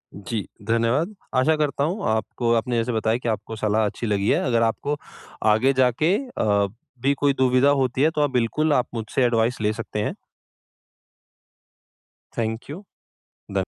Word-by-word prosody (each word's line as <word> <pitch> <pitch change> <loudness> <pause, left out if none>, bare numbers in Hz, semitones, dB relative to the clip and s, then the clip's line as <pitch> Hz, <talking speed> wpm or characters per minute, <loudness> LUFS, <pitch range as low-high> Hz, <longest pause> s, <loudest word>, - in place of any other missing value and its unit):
जी, 105 +1 -4 0.2
धन्यवाद। 115 - +1 0.2
आशा 130 +5 +4
करता 145 -2 0
हूँ 180 +8 -2
आपको 110 +2 -1
आपने 120 +1 0
जैसे 115 +2 0
बताया 110 +1 +1
कि 120 -1 -3
आपको 110 +1 -3
सलाह 110 0 +1
अच्छी 110 +3 -3
लगी 100 -1 +1
है। - - +3
अगर 115 -2 +2
आपको 140 +6 -1 0.6
आगे 130 +6 +3
जाके 130 +8 +3
अ, 105 - 0 0.3
भी 140 +3 +3
कोई 140 -1 +3
दुविधा 130 +1 +3
होती 130 -2 +1
है 155 - +5
तो 150 - +1
आप 145 - +2
बिल्कुल 130 +5 +1
आप 125 -3 +2
मुझसे 115 +3 -2
एडवाइस 120 0 +1
ले 105 - +2
सकते 110 -1 -5
हैं। 105 - -1 2.2
Thank 115 +2 -3
you. 165 +8 -7 0.7
धन - - 0
120 Hz, 160 wpm, -23 LUFS, 110-140 Hz, 2.2 s, है